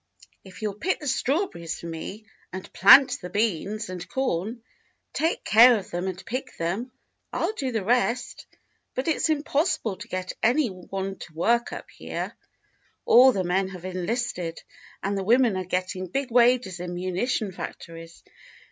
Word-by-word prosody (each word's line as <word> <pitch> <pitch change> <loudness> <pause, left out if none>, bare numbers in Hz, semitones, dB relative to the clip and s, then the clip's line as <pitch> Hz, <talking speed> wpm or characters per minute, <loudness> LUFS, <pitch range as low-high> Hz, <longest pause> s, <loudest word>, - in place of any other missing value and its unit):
^ - - -23 0.2
If 190 +3 -12
you'll 210 -2 -1
pick 375 - 0
the 300 - -9
strawberries 255 - -1
for - - -10
me 170 +6 -7 0.3
and 185 0 -8
plant 225 +8 +7
the 180 - -6
beans 210 0 -1
and 180 -1 -7
corn, 225 -1 -2 0.5
take 325 +2 0
care 235 +2 +7
of 200 - -8
them 175 +2 -2
and 190 0 -5
pick 255 +3 -5
them, 190 +10 -2 0.4
I - - -3
'11 435 - -1
do 265 -2 -1
the 220 -4 -1
rest; 245 +1 0 0.5
but 255 - -2
it's 320 0 +1
impossible 295 - 0
to 205 - -9
get 185 0 -4
any 245 +3 +3
one 190 +1 -5
to 165 - -10
work 235 +8 +1
up - - -8
here. - - -5 0.7
All 255 +2 +8
the 195 -5 -1
men 185 +2 +1
have 185 -2 -9
enlisted, 185 -2 -3 0.4
and 200 +1 -1
the 195 - -2
women 235 +1 +4
are 185 0 -3
getting 185 +1 -2
big 270 +7 -3
wages 235 -6 +3
in 175 0 -5
munition 190 +4 -1
factories. 165 -2 -9
200 Hz, 165 wpm, -25 LUFS, 180-245 Hz, 0.7 s, All